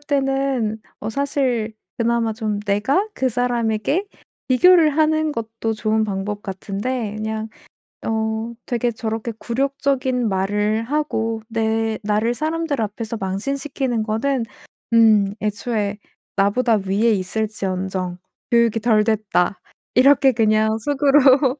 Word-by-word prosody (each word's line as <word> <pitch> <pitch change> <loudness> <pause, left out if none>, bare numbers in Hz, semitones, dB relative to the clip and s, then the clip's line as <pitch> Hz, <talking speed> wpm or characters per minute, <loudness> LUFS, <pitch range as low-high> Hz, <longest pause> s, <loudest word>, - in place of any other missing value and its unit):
때는 270 -6 0 0.2
어 220 - -3
사실 255 -5 -1 0.2
그나마 230 -1 +1
좀 215 -2 -2
내가 210 - +1
그 260 - +1
사람에게 245 - 0 0.4
비교를 325 +5 +6
하는 310 0 +2
것도 225 -2 -3
좋은 215 0 0
방법 205 +1 -3
같은데 205 +4 -3
그냥 220 0 -3 0.6
어 220 +1 -1
되게 240 0 0
저렇게 225 0 -4
굴욕적인 260 -1 0
말을 205 +3 0
하고 230 -5 -1
내 225 -1 0
나를 215 +3 +1
사람들 310 -1 -2
앞에서 220 +2 -4
망신시키는 255 +5 -2
거는 235 +4 0 0.5
음 215 -3 +5
'애초에 210 -1 -2 0.4
나보다 215 +2 +2
위에 215 +4 +2
있을지언정 190 -2 -2 0.3
교육이 235 -2 +3
덜 215 -2 +3
됐다.' 210 -4 0 0.3
이렇게 270 +1 +6
그냥 220 -1 +2
속으로 275 0 +4
225 Hz, 250 characters per minute, -21 LUFS, 215-260 Hz, 0.6 s, 비교를